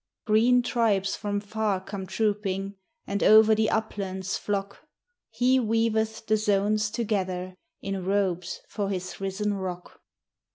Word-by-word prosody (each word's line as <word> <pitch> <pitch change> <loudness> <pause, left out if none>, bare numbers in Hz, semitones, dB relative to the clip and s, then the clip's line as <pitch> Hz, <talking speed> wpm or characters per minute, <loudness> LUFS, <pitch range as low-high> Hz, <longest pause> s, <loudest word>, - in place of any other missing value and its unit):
Green 240 +3 +4
tribes 210 -6 +1
from 205 -1 -2
far 210 -1 -1
come 190 0 -7
trooping, 200 -1 -1 0.3
And 200 0 -2
over 220 0 +7
the 220 0 +2
uplands 195 -4 -2
flock; 200 -1 -4 0.4
He 255 +1 +2
weaveth 220 -1 0
the 215 0 +2
zones 210 0 +1
together 190 -5 -2 0.3
In 195 -1 -3
robes 190 -2 -1
for 205 -2 -3
his 185 -1 -5
risen 200 +2 -1
rock. 185 -2 -6
205 Hz, 125 wpm, -26 LUFS, 195-220 Hz, 0.4 s, over